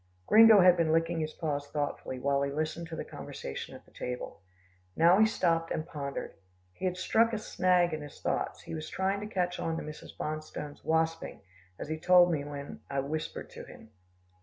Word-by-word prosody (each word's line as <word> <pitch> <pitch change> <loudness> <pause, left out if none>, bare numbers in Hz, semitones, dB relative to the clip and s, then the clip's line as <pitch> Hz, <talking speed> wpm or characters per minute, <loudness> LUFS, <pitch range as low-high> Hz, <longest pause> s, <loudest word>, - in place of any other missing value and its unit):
Gringo 220 -2 +8
had 180 -1 +6
been 165 -2 +2
licking 165 +1 +1
his 155 -1 -3
paw 150 -4 -2
thoughtfully, 145 -2 -4
while 140 +2 +1
he 140 0 -1
listened 155 +3 -3
to 165 - -6
the - - -5
conversation 70 - -7
at - - -14
the - - -23
table. 125 -9 -6 0.5
Now 170 +4 +5
he 220 - +6
stopped, 165 -5 +1
and 155 - -2
pondered. 140 -3 -5 0.4
He 190 - -6
had 180 -1 -1
struck 230 +5 +2
a - - 0
snag 180 -4 +2
in 155 - -3
his 145 -1 -10
thoughts. - - -2
He - - -8
was 155 0 -5
trying 195 +1 -1
to 210 - -5
catch 180 -4 -1
on 165 0 -2
to - - -4
Mrs. 150 0 -10
Bonstone's 155 -1 -5
wasping, 160 0 -1 0.4
as - - -6
he 155 +1 -3
told 180 +1 +6
me 150 -4 -1
when 145 -1 -7
I 140 - -1
whispered 155 +3 -5
to - - -9
him. 110 - -14
160 Hz, 200 wpm, -30 LUFS, 145-180 Hz, 0.5 s, Gringo